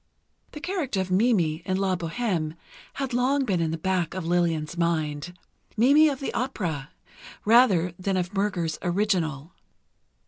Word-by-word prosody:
The 300 - -7
character 310 - -2
of 190 -1 -2
Mimi, 185 -6 +2
in 185 0 -1
"La 190 -1 +1
Bohême," 170 -2 -2 0.4
had 270 -2 -4
long 265 +3 +2
been 185 -7 0
in 165 - 0
the 165 - -2
back 180 0 -1
of 185 -3 -4
Lillian's 165 -3 0
mind—Mimi 175 - +1
of 275 -2 -4
the 275 - -4
opera, 170 - -3 0.6
rather 205 -7 +5
than 190 0 -1
of 180 +2 -2
Murger's 195 -5 -1
original. 175 -5 -1
185 Hz, 140 wpm, -26 LUFS, 165-230 Hz, 0.6 s, rather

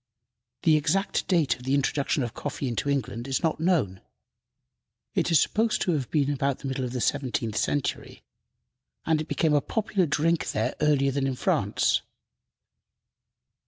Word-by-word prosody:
The 160 -3 +5
exact 165 +7 0
date 165 -7 +2
of - - -16
the 135 +2 +1
introduction 140 +1 0
of 120 - -4
coffee 140 - -4
into 125 +4 -2
England 120 -3 -2
is 135 +5 -1
not 160 -2 0
known. 155 - +1 1.1
It - - +1
is 165 -4 +5
supposed 220 +7 +1
to 180 - +1
have 140 -7 -1
been 145 -2 +1
about 140 -1 0
the 140 - -7
middle 130 0 -2
of 125 - -3
the 125 - -2
seventeenth 115 -6 -1
century, 145 +4 -2 0.8
and 160 -1 +2
it 155 - -6
became 155 -1 +1
a 145 - +4
popular 200 -3 0
drink 165 +3 +1
there - - 0
earlier 140 -2 +3
than 135 0 0
in 135 - -2
France. - - +1
145 Hz, 160 wpm, -26 LUFS, 130-160 Hz, 1.1 s, The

